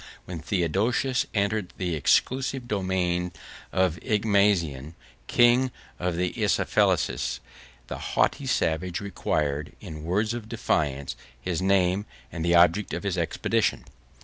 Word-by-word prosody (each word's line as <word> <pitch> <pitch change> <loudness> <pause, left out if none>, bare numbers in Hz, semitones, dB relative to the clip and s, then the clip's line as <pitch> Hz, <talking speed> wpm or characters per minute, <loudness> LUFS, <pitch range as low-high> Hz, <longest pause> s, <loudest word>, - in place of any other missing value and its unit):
When 90 -3 -6
Theodosius 100 +10 0
entered 100 -2 0
the 90 -3 -2
extensive 130 - +1
dominions 90 -4 -1 0.4
of 95 -3 +1
Igmazen, 100 -9 +1 0.3
king 120 +2 +4 0.3
of 90 -1 -1
the 90 +1 -1
Isaflenses, - - +1 0.5
the - - -6
haughty - - 0
savage 85 +2 0
required, 75 -6 -2
in 80 -6 -8
words 105 +7 0
of 115 -2 -6
defiance, 70 -2 -1 0.2
his 90 +5 -2
name, 95 +1 +2 0.2
and 80 - -4
the 85 +1 +3
object 85 +4 +4
of - - -5
his 100 -3 -1
expedition. 85 -2 0
90 Hz, 120 wpm, -26 LUFS, 85-105 Hz, 0.5 s, king